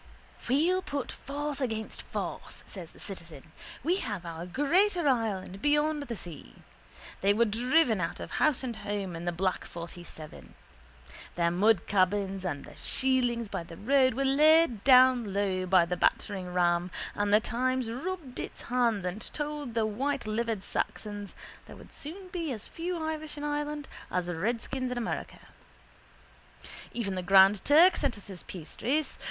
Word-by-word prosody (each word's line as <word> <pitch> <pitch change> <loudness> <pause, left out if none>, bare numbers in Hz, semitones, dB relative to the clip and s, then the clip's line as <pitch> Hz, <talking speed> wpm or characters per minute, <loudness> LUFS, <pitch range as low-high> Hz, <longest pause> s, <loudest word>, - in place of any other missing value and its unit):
—We'll 330 +9 +3
put 285 -6 -4
force 285 +1 -4
against 220 -4 -3
force, - - -5
says 175 -4 -8
the - - -18
citizen. 165 -6 -8 0.3
We 345 +6 +2
have 205 - -4
our 170 +1 -6
greater 340 - +2
Ireland 205 -7 0
beyond 295 +2 +2
the 245 -5 -5
sea. 160 - -11 0.6
They 200 +1 +4
were 235 +2 +4
driven 240 - +2
out 165 - -3
of - - -7
house 305 -5 +2
and 240 -4 -4
home 200 -3 -3
in 165 +1 -6
the 175 - +1
black 185 +2 -1
47. 170 -2 -9 0.8
Their 170 -1 +2
mudcabins 195 0 +2
and 150 -6 -3
their - - -13
shielings 245 -3 +1
by 195 - -4
the 165 -1 -11
roadside 260 +2 +3
were 275 +1 0
laid 300 -3 +5
low 210 -8 +5
by 180 -2 +5
the 180 +1 -2
batteringram 180 -3 +1 0.2
and 205 0 0
the 210 - +7
Times 255 +1 -1
rubbed 295 0 -5
its - - -6
hands 235 -6 +1
and 180 +4 -5
told 295 -5 -4
the 225 -1 +2
whitelivered 230 -3 -1
Saxons 205 -1 -3 0.3
there - - -10
would - - -14
soon 365 +6 -8
be 335 -4 -3
as 220 -5 -5
few 350 +2 -4
Irish 315 -1 -4
in 290 - -5
Ireland 295 0 -2 0.2
as 180 -1 -1
redskins 235 +8 -2
in 250 - -3
America. 235 -1 -4 1.5
Even 215 -5 -2
the 185 - -2
Grand 195 +2 +6
Turk 335 +5 +7
sent 270 -6 0
us 205 - -9
his 190 -4 -7
piastres. 260 - -3
230 Hz, 150 wpm, -29 LUFS, 190-285 Hz, 1.5 s, the